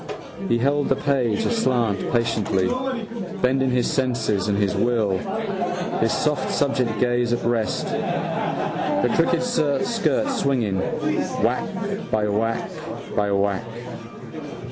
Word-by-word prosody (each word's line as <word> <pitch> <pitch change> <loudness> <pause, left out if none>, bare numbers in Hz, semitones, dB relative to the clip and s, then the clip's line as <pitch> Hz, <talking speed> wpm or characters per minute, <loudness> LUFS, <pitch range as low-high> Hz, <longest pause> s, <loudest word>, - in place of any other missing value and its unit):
He 120 - +4
held 140 +4 +1
the 135 - +4
page 130 -7 +1
aslant 120 - +1
patiently, 115 -5 +1 0.7
bending 130 +1 +2
his 125 -1 +2
senses 115 -7 0
and 100 -1 +1
his 100 -2 +2
will, 110 -6 +2 0.8
his 115 - +2
soft 150 -3 0
subject 130 -6 +1
gaze 120 -1 +2
at 120 - -1
rest. 115 -2 0
The - - -1
crooked - - +3
skirt 160 - +1
swinging, 130 - +1 0.6
whack - - +1 0.4
by 105 -1 +1
whack 115 +2 0 0.4
by 105 -1 +1
whack. 100 +1 +1
120 Hz, 110 wpm, -23 LUFS, 105-135 Hz, 0.8 s, He